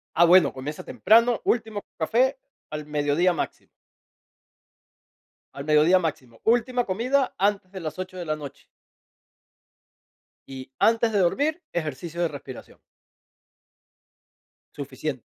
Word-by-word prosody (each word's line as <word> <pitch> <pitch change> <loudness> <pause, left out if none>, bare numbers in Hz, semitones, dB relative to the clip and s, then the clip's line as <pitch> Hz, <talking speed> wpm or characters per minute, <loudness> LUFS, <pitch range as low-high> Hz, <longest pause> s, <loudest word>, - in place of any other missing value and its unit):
Ah, 170 - +6
bueno, 175 -4 +6
comienza 140 +3 -7
temprano, 230 +2 +3
último 220 -3 -1 0.2
café 255 - +1 0.3
al 150 0 -5
mediodía 150 +4 +1
máximo. - - -5 1.9
Al 140 - -7
mediodía 155 +4 +5
máximo. 130 -9 -5
Última 245 +2 +2
comida 250 +8 0
antes 200 -1 0
de 190 - -7
las 155 +2 -6
8 185 0 -6
de 175 - -5
la 155 -1 -2
noche. 145 -3 -10 1.8
Y 130 0 -9
antes 225 0 +3
de 205 - +2
dormir, 290 - +1
ejercicio 165 +1 -4
de 170 - +2
respiración. 140 -3 -10 2.0
Suficiente. - - -5
180 Hz, 115 wpm, -25 LUFS, 150-225 Hz, 2.0 s, Ah